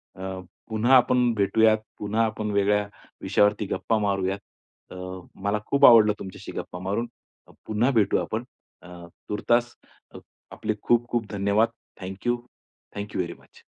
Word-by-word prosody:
अ, 95 0 -6 0.3
पुन्हा 115 +4 +3
आपण 125 -1 +3
भेटूयात, 110 +2 +4 0.2
पुन्हा 105 +2 +1
आपण 110 -1 -3
वेगळ्या 100 0 +2 0.3
विषयावरती 105 +1 +2
गप्पा 105 +4 0
मारूयात. 100 -1 0 0.5
अ, - - -9 0.5
मला 105 +1 +1
खूप 140 0 +5
आवडलं 110 -3 +8
तुमच्याशी 95 -1 -8
गप्पा 90 - -7
मारून. 100 +6 -2 0.6
पुन्हा 110 +4 +1
भेटूया 110 -6 +2
आपण 110 +2 -3 0.4
अ, 90 - -14 0.4
तूर्तास 120 +3 +1 0.8
आपले 110 - -2
खूप, 120 0 +2
खूप 120 -2 -1
धन्यवाद. 100 +2 +2 0.3
Thank 95 +4 -7
you, 120 - +3 0.6
thank 105 0 -6
you - - -1
very 85 -1 -4
much. - - -21
105 Hz, 140 wpm, -25 LUFS, 100-115 Hz, 0.8 s, आवडलं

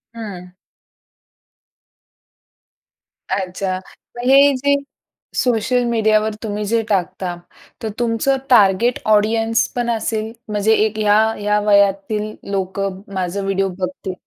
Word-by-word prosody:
हं. 200 -6 -7 2.8
अच्छा, 190 0 -2 0.4
मग - - -4
हे 280 +1 +6
जे 285 +2 +2 0.6
सोशल 245 +1 +1
मीडियावर 220 -2 +2
तुम्ही 210 -1 -3
जे 225 +2 +1
टाकता, 185 -2 -1 0.5
तर 220 - -2
तुमचं 240 +3 +1
टार्गेट 225 +1 +4
ऑडियन्सपण 225 +3 +1
असेल, 220 -1 -2 0.2
म्हणजे 210 +1 +2
एक 215 0 -3
ह्या, 210 0 +4 0.2
ह्या 210 0 +1
वयातील 205 +1 +2 0.2
लोकं 195 0 -3
माझा 190 +1 -2
व्हिडिओ 195 0 0
बघतील 185 0 -4
210 Hz, 100 wpm, -19 LUFS, 195-225 Hz, 2.8 s, हे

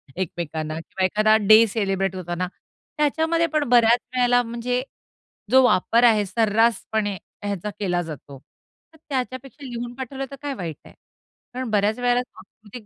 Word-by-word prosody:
एकमेकांना 160 -3 -4
किंवा 185 +3 -2
एखादा 215 +3 +3
डे 220 +1 +8
सेलिब्रेट 195 -3 -1
होताना 180 0 -3 0.5
त्याच्यामध्ये 320 +3 +1
पण 305 -1 +2
बऱ्याच 240 0 +5 0.2
वेळेला 245 0 +4
म्हणजे 240 +2 -2 0.7
जो 260 0 +7
वापर 235 +1 +3
आहे 215 -4 +5
सर्रासपणे 220 0 +1 0.3
ह्याचा 205 -1 -3
केला 180 -3 0
जातो. 145 -4 -9 0.6
तर - - -19
त्याच्यापेक्षा 265 +1 -5
लिहून 240 -1 -6
पाठवलं 270 +1 -5
तर - - -6
काय 285 -1 -3
वाईट 165 -6 -5
आहे - - -15 0.6
कारण 255 -1 -4
बऱ्याच 210 +2 +1
वेळेला 245 0 +2
सांस्कृतिक 220 -1 -14
225 Hz, 140 wpm, -23 LUFS, 195-250 Hz, 0.7 s, डे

